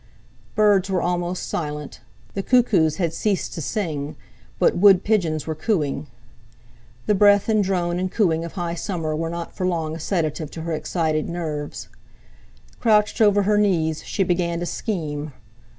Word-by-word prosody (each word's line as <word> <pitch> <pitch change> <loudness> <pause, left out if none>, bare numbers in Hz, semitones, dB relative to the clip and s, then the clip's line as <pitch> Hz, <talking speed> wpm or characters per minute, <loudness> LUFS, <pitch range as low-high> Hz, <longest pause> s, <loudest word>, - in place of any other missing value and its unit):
Birds 205 -2 +4
were 190 -1 +1
almost 175 0 -2
silent, 150 -3 -4 0.3
the 195 - -2
cuckoos 195 - +3
had 170 -3 -1
ceased 200 +2 -1
to 165 - -5
sing, 150 -3 -3 0.4
but - - +3
wood 195 0 +6
pigeons 170 -8 +1
were 160 - -2
cooing. 155 -5 -1 1.0
The 210 - +3
breath 205 0 +5
and 215 -2 +3
drone 180 -2 0
and 185 0 -2
cooing 165 -7 +1
of 170 - -7
high 175 -3 -3
summer 165 -3 -3
were 165 +1 -2
not 170 0 -6
for 185 - -1
long 160 -3 -1
a - - -7
sedative 155 -3 -2
to 160 - -7
her 165 0 -3
excited 155 0 -1
nerves. 155 -4 -4 0.9
Crouched 215 0 +3
over 205 -1 +5
her 210 +1 +3
knees 160 -6 +1
she 195 - -1
began 175 -2 0
to 175 - -3
scheme. 155 - -3
175 Hz, 160 wpm, -23 LUFS, 155-195 Hz, 1.0 s, wood